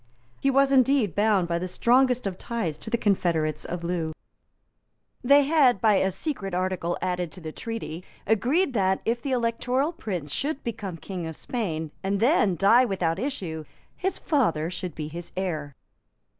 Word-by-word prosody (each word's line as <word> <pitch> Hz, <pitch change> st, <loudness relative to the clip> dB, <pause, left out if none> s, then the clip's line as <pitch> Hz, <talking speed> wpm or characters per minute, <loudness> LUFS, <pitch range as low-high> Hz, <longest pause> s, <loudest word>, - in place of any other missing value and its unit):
He 275 Hz, -, +2 dB
was 275 Hz, 0 st, +4 dB
indeed 260 Hz, -, +4 dB
bound 205 Hz, -3 st, +2 dB
by 170 Hz, 0 st, 0 dB
the 180 Hz, -, -3 dB
strongest 250 Hz, +5 st, +3 dB
ties 180 Hz, -11 st, -3 dB
to -, -, -7 dB
the 235 Hz, -, +1 dB
confederates 165 Hz, -8 st, 0 dB
of 175 Hz, 0 st, -5 dB
Loo. 170 Hz, -2 st, -2 dB, 1.1 s
They 280 Hz, +3 st, +6 dB
had, 275 Hz, -7 st, +4 dB
by 210 Hz, 0 st, +4 dB
a 190 Hz, -, +2 dB
secret 195 Hz, -, -3 dB
article, 180 Hz, -2 st, -1 dB
added 180 Hz, -2 st, -1 dB
to -, -, -10 dB
the 160 Hz, -2 st, -6 dB
treaty, 185 Hz, -5 st, -6 dB, 0.2 s
agreed 260 Hz, -, +2 dB
that, 190 Hz, -3 st, +1 dB
if 235 Hz, +1 st, 0 dB
the 275 Hz, -, -3 dB
Electoral 250 Hz, +4 st, 0 dB
Prince 180 Hz, -, -5 dB
should 285 Hz, +1 st, -2 dB
become 210 Hz, -7 st, -5 dB
King 180 Hz, 0 st, -5 dB
of 160 Hz, -, -7 dB
Spain, 160 Hz, -, -3 dB
and 195 Hz, +1 st, -1 dB
then 220 Hz, -, +3 dB
die 215 Hz, +8 st, +5 dB
without 185 Hz, -6 st, 0 dB
issue, 190 Hz, -, -3 dB, 0.3 s
his 380 Hz, +1 st, -2 dB
father 175 Hz, -, +1 dB
should 180 Hz, -2 st, -5 dB
be 155 Hz, -1 st, -4 dB
his 170 Hz, +2 st, -8 dB
heir. 155 Hz, -7 st, -3 dB
195 Hz, 165 wpm, -26 LUFS, 170-250 Hz, 1.1 s, They